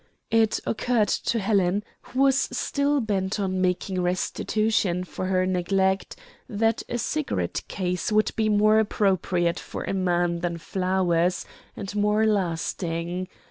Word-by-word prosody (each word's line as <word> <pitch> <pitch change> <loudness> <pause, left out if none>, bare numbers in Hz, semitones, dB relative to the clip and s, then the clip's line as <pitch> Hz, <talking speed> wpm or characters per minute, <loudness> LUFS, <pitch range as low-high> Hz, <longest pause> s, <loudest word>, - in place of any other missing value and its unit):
It 225 -1 +3
occurred 225 -2 +1
to 235 - 0
Helen, 200 -2 +1 0.2
who 260 - -3
was 270 -1 +5 0.2
still 280 +3 0
bent 200 -2 -1
on 185 -2 -1
making 185 0 0
restitution 185 +1 0
for 185 +1 -5
her 185 -1 +2
neglect, 190 +1 0 0.3
that 225 +1 +1
a 240 - -1
cigarette 305 +5 -2
case 180 0 -2
would 215 0 +3
be 220 -1 +1
more 215 +1 +4
appropriate 185 -5 +1
for - - -6
a - - -3
man 175 -2 +1
than 170 -1 -2
flowers, 180 -1 0 0.3
and 200 -1 -6
more 210 +1 +2
lasting. 175 -2 -1
190 Hz, 135 wpm, -25 LUFS, 180-215 Hz, 0.3 s, was